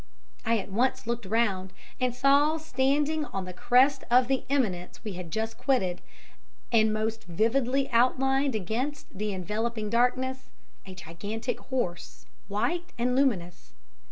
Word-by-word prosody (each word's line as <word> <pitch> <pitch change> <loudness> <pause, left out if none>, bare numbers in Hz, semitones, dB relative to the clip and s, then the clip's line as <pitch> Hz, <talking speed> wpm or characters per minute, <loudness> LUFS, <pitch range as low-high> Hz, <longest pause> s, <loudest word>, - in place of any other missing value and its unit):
I 230 0 +2
at 195 -1 -5
once 255 +5 +1
looked 235 -3 -3
round, 195 -4 0 0.3
and 250 -1 0
saw 280 +4 +4
standing 295 +1 +1
on 195 -8 -4
the 180 - -7
crest 260 +8 +3
of 245 +1 +5
the 270 -1 0
eminence 210 -12 -1
we 215 -3 -4
had 180 -2 -7
just 220 +5 -3
quitted, 190 -10 +1 0.7
and 220 -2 +4
most 220 +1 -2
vividly 245 +9 +1
outlined 265 +2 +2
against 235 +9 -3
the 210 +2 -2
enveloping 210 +3 -3
darkness, 255 +2 +1 0.4
a 190 - -9
gigantic 200 +7 -5
horse, 215 -10 -4 0.2
white 245 - -2
and 250 +1 +1
luminous. 185 - 0
235 Hz, 135 wpm, -28 LUFS, 205-265 Hz, 0.7 s, of